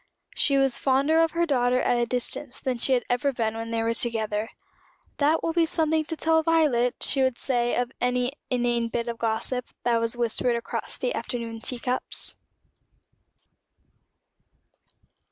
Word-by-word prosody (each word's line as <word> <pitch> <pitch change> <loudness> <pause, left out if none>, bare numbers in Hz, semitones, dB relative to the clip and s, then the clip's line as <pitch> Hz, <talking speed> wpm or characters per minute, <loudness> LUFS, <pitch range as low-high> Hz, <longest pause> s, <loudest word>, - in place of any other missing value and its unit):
She 280 -2 +3
was 270 -2 +2
fonder 275 +4 +3
of 330 -1 +1
her 340 0 +2
daughter 250 -4 +2
at 245 - +2
a 240 - +1
distance 250 +2 -3
than 255 -2 -2
she 265 - +2
had 245 -2 +1
ever 245 +3 +1
been 225 -3 -1
when 225 0 -5
they 230 0 -1
were 230 0 +1
together. 220 -2 -2 0.7
"That 305 +3 +2
will 330 - 0
be 335 -1 +3
something 315 -1 +1
to 325 +1 -5
tell 320 0 +3
Violet," 295 -7 +2
she 270 - +2
would 260 -2 +2
say 240 -2 +1
of 245 0 -1
any 250 +1 +1 0.2
inane 240 -2 +1
bit 235 +1 -3
of 235 -1 -4
gossip 235 +2 -1 0.2
that 235 -1 +2
was 230 +1 0
whispered 240 +1 +1
across 235 - -4
the - - -1
afternoon 230 -2 -4
tea 250 - -2
cups. 250 +1 -3
245 Hz, 165 wpm, -26 LUFS, 235-280 Hz, 0.7 s, She